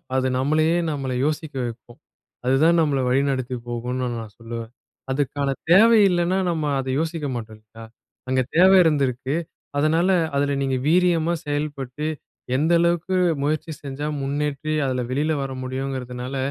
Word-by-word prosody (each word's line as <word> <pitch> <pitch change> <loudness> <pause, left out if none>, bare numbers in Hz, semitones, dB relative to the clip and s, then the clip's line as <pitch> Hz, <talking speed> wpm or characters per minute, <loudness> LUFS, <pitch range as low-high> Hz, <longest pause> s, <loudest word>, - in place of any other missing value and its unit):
அது 130 0 +2
நம்மளையே 155 +5 +2
நம்மள 135 -3 -3
யோசிக்க 155 -1 -3
வைக்கும். 120 0 -9 0.5
அதுதான் 155 +6 +4
நம்மள 145 -3 +1
வழி 135 +2 +3
நடத்திப் 130 -2 -3
போகும்ன்னு 125 +2 -3
நான் 110 -2 -10
சொல்லுவேன். 115 0 -7 0.4
அதுக்கான 140 0 -1 0.2
தேவை 225 +4 +7
இல்லன்னா 175 +1 +1
நம்ம 160 -2 -1 0.2
அதை 130 0 -2
யோசிக்க 160 -2 -2
மாட்டோம் 110 -2 -7
இல்லையா? 110 +1 -14 0.5
அங்க 130 0 +2
தேவை 190 +3 +7
இருந்திருக்கு. 140 -3 0 0.4
அதனால 160 +5 +2 0.3
அதுல 140 0 +1
நீங்க 135 -1 0
வீரியமா 170 -1 +3
செயல்பட்டு 145 -1 -3 0.5
எந்த 160 +5 +2
அளவுக்கு 170 +2 +1 0.3
முயற்சி 155 +2 -1
செஞ்சா 140 +2 -4
முன்னேற்றி 145 +2 -2
அதுல 130 -1 -1
வெளியில 150 +4 +1
வர 135 - -5
முடியும்ங்கறதுனால 130 -1 -4
140 Hz, 135 wpm, -23 LUFS, 130-160 Hz, 0.5 s, தேவை